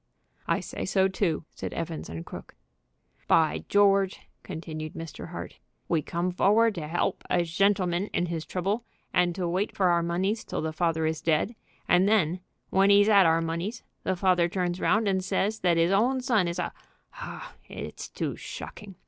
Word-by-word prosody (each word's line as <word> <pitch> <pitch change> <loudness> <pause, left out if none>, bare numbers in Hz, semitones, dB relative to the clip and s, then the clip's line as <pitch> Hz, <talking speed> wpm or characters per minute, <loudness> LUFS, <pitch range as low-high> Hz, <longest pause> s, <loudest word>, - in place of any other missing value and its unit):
"I - - +1
say - - -6
so 190 -1 +3
too," 180 -5 -1
said - - -6
Evans 165 -1 -4
& 85 - -7
Crooke. - - -10 0.7
"By 160 -2 +3
George!" 195 -1 +4 0.2
continued 155 -3 -6
Mr. 165 -1 -7
Hart, - - -8 0.3
"we 165 -2 +1
come 170 +4 -2
forward 215 +5 +4
to 155 -5 -5
'elp 175 - 0
a 175 -1 +2
shentleman 185 +1 +1
in 175 - 0
his 165 -2 -3
trouble 195 +7 -2 0.3
and 175 -1 +2
to 180 -2 -1
wait 185 +5 -1
for 185 -2 +3
our 170 -1 +3
moneys 185 +6 -1
till - - -4
the 160 0 -2
father 160 -1 0
is 160 0 -1
dead, 165 +7 +1 0.3
and 180 +3 +4
then 185 -5 +2 0.3
when 195 +1 +4
'e's 205 +1 +6
'ad 200 -4 +7
our 165 0 +3
moneys 170 +8 -3 0.2
the 190 - -1
father 180 -2 +3
turns 180 -1 -1
round 215 0 +2
and 190 -1 +1
says 210 +3 0
that 175 -2 +2
'is 165 +2 +3
own 240 +7 +3
son 225 -8 +2
is 170 +1 -3
a 180 - -2 0.5
Oh, - - -7 0.2
it's - - -7
too - - -3
shocking! 200 -3 -9
180 Hz, 180 wpm, -27 LUFS, 165-200 Hz, 0.7 s, ad